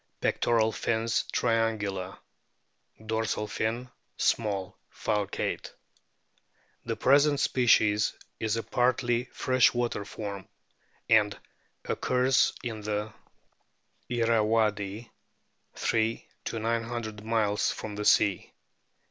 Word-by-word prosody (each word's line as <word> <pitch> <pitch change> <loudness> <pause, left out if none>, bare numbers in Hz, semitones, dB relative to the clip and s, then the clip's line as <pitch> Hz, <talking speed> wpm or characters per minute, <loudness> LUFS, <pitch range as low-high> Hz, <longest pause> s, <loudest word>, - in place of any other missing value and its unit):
Pectoral 110 -2 +2
fins 115 +1 0
triangular; 110 -5 0 0.9
dorsal 110 -1 -1
fin 115 +4 -3 0.3
small, 100 -4 0 0.2
falcate. 105 -2 -2 1.1
The - - -3
present 145 +1 +4
species 110 -4 +3 0.3
is 110 0 0
a 115 - -2
partly 120 -1 +1
fresh 130 0 +2
water 120 -4 -1
form, 100 -1 -7 0.6
and 105 -2 +4 0.5
occurs 125 +1 +2
in 115 -3 -4
the 105 +1 -3 1.0
Irrawaddy 110 -2 +1 0.6
3 115 0 0 0.2
900 115 -1 -3
miles 110 -2 +1
from 110 - -6
the 105 0 -4
sea. 100 -3 +3
110 Hz, 85 wpm, -28 LUFS, 105-120 Hz, 1.1 s, present